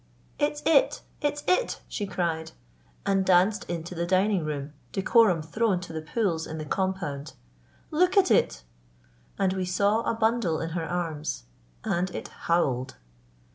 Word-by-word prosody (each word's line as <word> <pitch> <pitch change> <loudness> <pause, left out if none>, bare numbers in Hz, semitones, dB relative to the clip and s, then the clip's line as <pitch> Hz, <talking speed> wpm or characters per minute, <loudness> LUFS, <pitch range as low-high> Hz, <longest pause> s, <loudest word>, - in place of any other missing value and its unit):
"It's 295 0 0
it! 315 -3 +4 0.2
it's 290 -1 -1
it!" 425 +7 +2
she 205 - -3
cried, 170 -3 -2 0.5
and 195 -1 +2
danced 190 +3 +3
into 170 0 -4
the 170 0 -2
dining 190 0 +2
room, 145 -1 -4 0.2
decorum 195 -4 +4
thrown 195 +4 +1
to 175 -2 -8
the 160 - -3
pools 165 -1 -1
in 160 - -6
the 155 - -5
compound. 150 -6 -2 0.6
"Look 360 +5 +3
at 375 -2 +5
it!" 60 0 +2 0.7
and 190 -1 +2
we 190 -1 -1
saw 200 +4 +2
a 230 - -1
bundle 220 -7 +1
in 165 - -3
her 165 -1 -3
arms. 160 - -3 0.4
And 180 +2 0
it - - -5
howled. 135 -7 0
185 Hz, 150 wpm, -27 LUFS, 160-220 Hz, 0.7 s, at